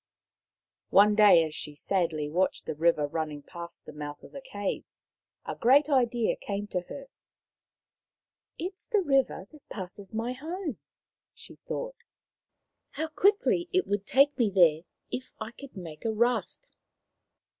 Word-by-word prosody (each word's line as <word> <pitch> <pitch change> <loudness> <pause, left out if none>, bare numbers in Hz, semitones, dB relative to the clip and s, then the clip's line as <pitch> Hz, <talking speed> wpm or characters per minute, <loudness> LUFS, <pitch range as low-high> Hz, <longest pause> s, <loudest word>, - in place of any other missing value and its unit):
One 210 +2 +6
day, 205 -5 +7
as 155 -1 -4
she 150 -1 -4
sadly 165 -3 0
watched 180 +5 0
the - - -3
river 155 -1 +2
running 150 -1 -4
past 170 +1 -9
the - - -10
mouth 145 0 -7
of - - -13
the 275 - -8
cave, 205 -7 -5 0.5
a - - -4
great 280 +5 +4
idea 240 -4 +2
came 200 0 -4
to 180 - -1
her. 275 -1 -7 0.8
" - - -49
It 365 +4 -4
is 375 - -13
the 420 -5 +2
river 275 - +1
that 305 -2 -18
passes 190 0 -7
my 230 +3 -2
home," 315 - -5 0.6
she - - -13
thought. - - -4 0.5
" - - -56
How 315 +1 -2
quickly 385 0 +2
it 370 0 +2
would 205 0 -2
take 280 +2 +4
me 230 -3 +4
there. 170 -4 +4 0.3
If 255 - -4
I 220 +1 -5
could 265 -2 -12
make 160 -4 -8
a 225 - 0
raft 240 - 0
215 Hz, 155 wpm, -28 LUFS, 170-280 Hz, 0.8 s, day